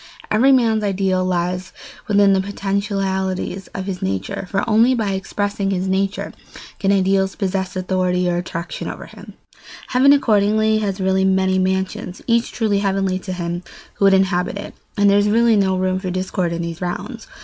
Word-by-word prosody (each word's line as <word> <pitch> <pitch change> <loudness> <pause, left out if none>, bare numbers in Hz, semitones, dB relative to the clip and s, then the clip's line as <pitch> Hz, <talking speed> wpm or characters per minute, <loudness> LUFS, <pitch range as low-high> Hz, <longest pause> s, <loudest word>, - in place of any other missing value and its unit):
Every 245 +6 +4
man's 225 -4 +3
ideal 190 -2 0
lies 180 0 -2 0.3
within 205 -1 +4
the 190 - +2
potentialities 195 -1 -2
of 190 - -6
his 190 -2 -4
nature, 95 - -3
for 200 +4 -1
only 230 +3 +4
by 215 -4 -1
expressing 200 +1 -2
his 190 -1 -1
nature 195 +2 -1 0.5
can 195 -1 +1
ideals 195 0 +2
possess 190 -2 -2
authority 185 -1 0
or 175 0 0
attraction 175 0 -5
over - - -7
him. - - -13 0.6
Heaven 265 +2 +5
accordingly 215 -4 +3
has 200 -2 -2
really 190 0 +1
many 190 0 +2
mansions, 190 0 -2
each 235 0 +1
truly 215 -4 0
heavenly 195 -2 0
to 185 - -7
him 175 -1 -3 0.3
who 200 - 0
would 195 0 +6
inhabit 190 0 +1
it, 200 - -7 0.2
and 205 0 +4
there 200 0 +5
is 205 0 +2
really 230 +1 +4
no 190 -2 +2
room 185 0 0
for 185 -1 -4
discord 185 -1 -2
in 170 0 -3
those 170 +1 -6
rounds. 225 +7 -5
195 Hz, 170 wpm, -20 LUFS, 185-205 Hz, 0.6 s, would